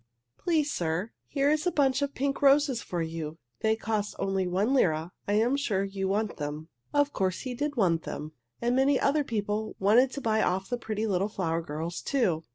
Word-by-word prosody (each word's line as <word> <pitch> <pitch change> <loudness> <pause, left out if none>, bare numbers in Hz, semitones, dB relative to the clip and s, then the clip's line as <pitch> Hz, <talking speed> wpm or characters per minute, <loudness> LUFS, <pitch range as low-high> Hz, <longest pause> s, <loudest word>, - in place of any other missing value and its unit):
Please, 310 -4 +1
sir, 175 +6 -1 0.2
here 285 0 +2
is 305 +3 +1
a - - +2
bunch 270 -3 +2
of 280 0 -2
pink 275 +1 -1
roses 280 -3 +4
for 175 -2 -3
you. 160 -1 -5 0.2
They 220 0 +2
cost 220 -2 -2
only 195 -1 0
one 195 +8 +1
lira. 165 - +2 0.2
I 205 - +1
am 230 +5 +3
sure 215 -9 0
you 195 -1 -3
want 210 +2 -1
them." 150 +2 -5 0.2
Of 290 0 +2
course 185 -2 0
he 255 -2 -4
did 290 +3 -2
want 170 -6 +3
them, 155 -1 -6 0.3
and 240 +1 +1
many 270 +1 +3
other 295 +2 +2
people 215 -3 -2
wanted 225 +7 +5
to 280 - -4
buy 220 -2 +2
of 190 +1 0
the 245 - -1
pretty 220 -1 -2
little 195 -1 0
flower 170 -5 -1
girls, 165 +2 -4
too. 190 - +1
215 Hz, 200 wpm, -28 LUFS, 180-270 Hz, 0.3 s, wanted